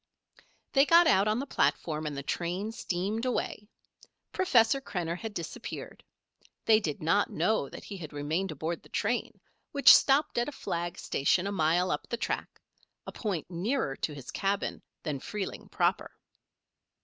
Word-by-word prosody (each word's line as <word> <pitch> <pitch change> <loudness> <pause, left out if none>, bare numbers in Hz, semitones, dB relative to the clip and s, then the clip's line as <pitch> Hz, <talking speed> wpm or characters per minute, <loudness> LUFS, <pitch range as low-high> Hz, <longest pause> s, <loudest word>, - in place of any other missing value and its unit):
They 275 - +6
got 340 +1 +7
out 200 -10 +4
on 215 +1 +2
the 270 - -2
platform 155 - 0
and 145 -2 -4
the 140 - -4
train 180 +8 -2
steamed 205 +1 -2
away. 220 -4 -2 0.6
Professor 270 -7 +3
Krenner 170 -9 -3
had 225 -1 -5
disappeared. 170 - -7 0.6
They 220 -1 +6
did 155 -8 -4
not 170 +6 +3
know 220 -11 0
that - - -10
he 200 - -7
had 155 -5 -8
remained 155 +6 -2
aboard 160 +3 -4
the - - -19
train, - - -1 0.3
which 280 -1 +9
stopped 275 -2 +3
at 240 - 0
a - - -9
flag 170 -7 -3
station 175 +6 +1
a 200 - -1
mile 175 0 +2
up 150 - -3
the 235 - -2
track - - -3 0.5
a - - -6
point 185 -6 -4
nearer 180 - -1
to 150 - -3
his 135 -3 -8
cabin 195 0 -1 0.2
than 150 -4 -3
Freeling 205 +6 -5
proper. - - +1
190 Hz, 160 wpm, -29 LUFS, 160-225 Hz, 0.6 s, which